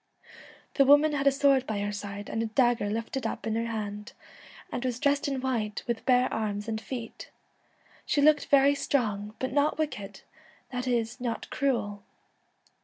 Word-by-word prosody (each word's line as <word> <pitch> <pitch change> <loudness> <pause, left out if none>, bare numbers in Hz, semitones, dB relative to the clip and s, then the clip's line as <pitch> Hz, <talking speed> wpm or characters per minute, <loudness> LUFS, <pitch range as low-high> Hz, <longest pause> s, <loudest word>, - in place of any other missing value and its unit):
The 275 - +5
woman 290 +3 +6
had 280 -1 +1
a - - +7
sword 275 -1 +3
by 220 - -2
her 205 0 -2
side 205 0 -6
and 225 - -2
a 225 - -1
dagger 235 -2 +2
lifted 230 +3 -3
up - - -5
in 220 - -1
her 230 +1 -1
hand, 210 -1 -5 0.6
and 245 - -3
was 250 -2 -2
dressed 285 +1 +1
in 270 -2 -2
white, 230 -6 -2
with 235 +1 -3
bare 250 0 +4
arms 210 -1 -2
and 220 -1 -3
feet. 240 -3 -7 0.8
She - - +1
looked 295 0 +4
'very 280 0 +5
strong, 215 -7 -1
but 260 0 -3
not 290 +1 +2
wicked,' 210 -11 -4 0.5
that 250 0 -3
is, 240 0 -1
not 240 -2 -3
cruel. 235 -7 -1
240 Hz, 175 wpm, -28 LUFS, 215-275 Hz, 0.8 s, a